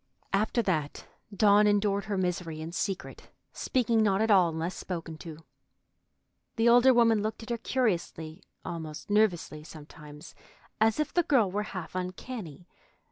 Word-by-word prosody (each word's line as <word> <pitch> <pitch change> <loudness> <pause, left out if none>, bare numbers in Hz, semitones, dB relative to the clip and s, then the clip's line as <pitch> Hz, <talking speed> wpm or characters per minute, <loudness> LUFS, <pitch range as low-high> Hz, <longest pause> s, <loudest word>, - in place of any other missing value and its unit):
After 220 +4 +1
that, 155 -7 -2 0.3
Dawn 205 +1 +4
endured 205 0 +1
her 205 -2 -2
misery 180 -3 -2
in 160 +1 -6
secret, 190 +2 -4 0.2
speaking 235 -3 +1
not 200 -2 +2
at 220 0 +2
all, 185 -4 +5
unless 165 +3 -3
spoken 165 -3 -6
to. 160 -2 -9 1.2
The 225 0 +2
older 245 +2 +7
woman 230 -3 +4
looked 215 +2 -4
at 225 - -7
her 235 - 0
curiously, 180 -9 -2 0.2
almost 160 +2 -6
nervously, 180 -7 +1
sometimes, 150 -1 -12 0.5
as 220 +4 +3
if 305 - -1
the 350 - +4
girl 260 - +2
were 205 +2 -1 0.2
half 165 -3 -7
uncanny. 185 - -6
195 Hz, 145 wpm, -28 LUFS, 165-220 Hz, 1.2 s, older